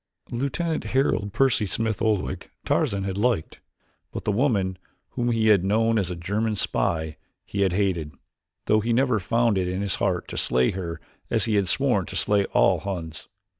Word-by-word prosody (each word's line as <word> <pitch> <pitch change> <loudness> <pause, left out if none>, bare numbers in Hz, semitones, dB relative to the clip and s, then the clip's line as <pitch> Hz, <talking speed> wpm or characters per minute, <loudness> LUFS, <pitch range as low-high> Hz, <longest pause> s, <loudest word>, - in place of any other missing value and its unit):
Lieutenant 140 +7 -2
Harold 110 -6 0
Percy 125 -3 +2
Smith 110 +1 -1
Oldwick 105 -4 -1 0.2
Tarzan 100 -1 +1
had 95 0 -3
liked, 115 -7 0 0.5
but - - -6
the - - +2
woman 100 -6 +1 0.3
whom 120 0 -1
he 110 -1 +2
had 100 -4 +5
known 110 +3 +2
as 95 -3 -1
a 90 - -4
German 105 +6 -1
spy 80 -5 -1 0.3
he 100 - -3
had 95 -3 +2
hated, 90 -6 0 0.5
though 110 - +3
he 115 +2 0
never 125 -2 +2
had 95 - -13
found 115 -4 +2
it 90 - -1
in 90 +2 -2
his 100 - 0
heart 90 -3 0
to - - -6
slay 65 0 +2
her 85 -3 -5 0.3
as - - +1
he 110 - 0
had 100 -2 +2
sworn 105 -2 +1
to - - -7
slay 100 -1 +2
all - - +3
Huns. 85 -5 -6
100 Hz, 185 wpm, -25 LUFS, 95-115 Hz, 0.5 s, had